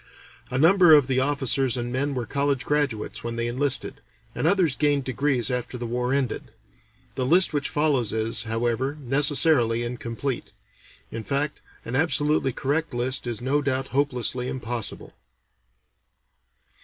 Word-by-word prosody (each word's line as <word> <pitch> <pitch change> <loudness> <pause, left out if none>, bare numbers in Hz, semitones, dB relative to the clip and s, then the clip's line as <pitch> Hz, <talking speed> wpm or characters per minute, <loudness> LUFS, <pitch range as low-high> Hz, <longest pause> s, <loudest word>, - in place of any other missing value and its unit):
A 125 - -2
number 170 +2 +6
of 145 -3 +4
the 130 0 0
officers 135 -2 +1
and 120 0 -4
men 140 +2 -1
were 125 -2 -3
college 140 +2 -1
graduates 145 -7 -2
when 115 0 -4
they 115 0 -2
enlisted, 130 +3 -1 0.3
and - - -1
others 175 -6 +2
gained 145 -2 +1
degrees 130 -1 0
after 125 0 -3
the 120 - -5
war 125 +2 -2
ended; 135 -3 -1 0.7
the 130 - -2
list 170 +7 +4
which 145 -2 -1
follows 145 -7 0
is, 110 0 -1
however, 120 +5 -1
necessarily 135 -3 +3
incomplete; 120 +2 -5 0.6
in 115 0 -5
fact, 145 +3 -2 0.2
an 115 - -4
absolutely 150 -2 +1
correct 145 +3 -2
list 125 +1 -1
is 120 -2 -4
no 140 +4 0
doubt 135 -1 -2
hopelessly 125 -2 0
impossible. 120 -3 -4
130 Hz, 145 wpm, -24 LUFS, 120-145 Hz, 0.7 s, number